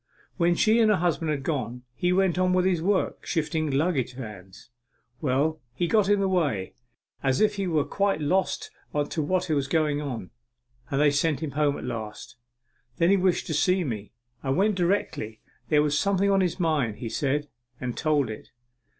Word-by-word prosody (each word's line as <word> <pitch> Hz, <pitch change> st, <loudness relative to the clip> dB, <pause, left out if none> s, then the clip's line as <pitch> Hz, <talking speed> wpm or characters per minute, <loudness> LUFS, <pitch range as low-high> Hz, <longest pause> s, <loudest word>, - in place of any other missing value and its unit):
When 175 Hz, -1 st, +3 dB
she 220 Hz, +5 st, +4 dB
and 220 Hz, -2 st, +5 dB
her 210 Hz, -, +4 dB
husband 170 Hz, -2 st, 0 dB
had 145 Hz, -3 st, -1 dB
gone, 125 Hz, -5 st, -3 dB
he 180 Hz, +7 st, 0 dB
went 185 Hz, -1 st, +2 dB
on 185 Hz, 0 st, +3 dB
with 185 Hz, 0 st, +3 dB
his 180 Hz, -3 st, +2 dB
work, 190 Hz, +2 st, 0 dB
shifting 160 Hz, -1 st, -1 dB
luggage 135 Hz, -3 st, 0 dB
vans. 105 Hz, -3 st, -10 dB, 0.5 s
Well, 150 Hz, +3 st, +1 dB
he 175 Hz, -, 0 dB
got 205 Hz, +2 st, +3 dB
in 205 Hz, -1 st, +4 dB
the 195 Hz, -, +2 dB
way, 150 Hz, -, 0 dB, 0.5 s
as 135 Hz, -1 st, +1 dB
if 215 Hz, -1 st, +3 dB
he 195 Hz, -1 st, -1 dB
were 155 Hz, -4 st, +2 dB
quite 200 Hz, 0 st, 0 dB
lost 180 Hz, +6 st, 0 dB, 0.4 s
to 160 Hz, -, -1 dB
what 185 Hz, +4 st, 0 dB
was 145 Hz, -4 st, 0 dB
going 150 Hz, -1 st, +1 dB
on, 125 Hz, -10 st, -5 dB, 0.6 s
and 135 Hz, -, 0 dB
they 145 Hz, -1 st, +5 dB
sent 145 Hz, 0 st, +1 dB
him 155 Hz, -3 st, -3 dB
home 145 Hz, 0 st, +1 dB
at -, -, -8 dB
last. 115 Hz, -1 st, -6 dB, 0.6 s
Then 170 Hz, +3 st, +4 dB
he 200 Hz, -, +5 dB
wished 185 Hz, -1 st, +1 dB
to 160 Hz, -, -3 dB
see 180 Hz, +5 st, +2 dB
me. 105 Hz, -, -5 dB, 0.3 s
I 135 Hz, -, -4 dB
went 195 Hz, +10 st, +3 dB
directly. 175 Hz, -, -1 dB, 0.3 s
There 150 Hz, -1 st, +4 dB
was 150 Hz, 0 st, +1 dB
something 200 Hz, 0 st, +2 dB
on 195 Hz, -1 st, +4 dB
his 180 Hz, 0 st, -1 dB
mind, 150 Hz, -, +1 dB
he 115 Hz, -, -6 dB
said, 145 Hz, +5 st, -1 dB, 0.3 s
and 125 Hz, -2 st, -4 dB
told 145 Hz, -7 st, +1 dB
it. 110 Hz, -, -9 dB
155 Hz, 190 wpm, -26 LUFS, 135-185 Hz, 0.6 s, and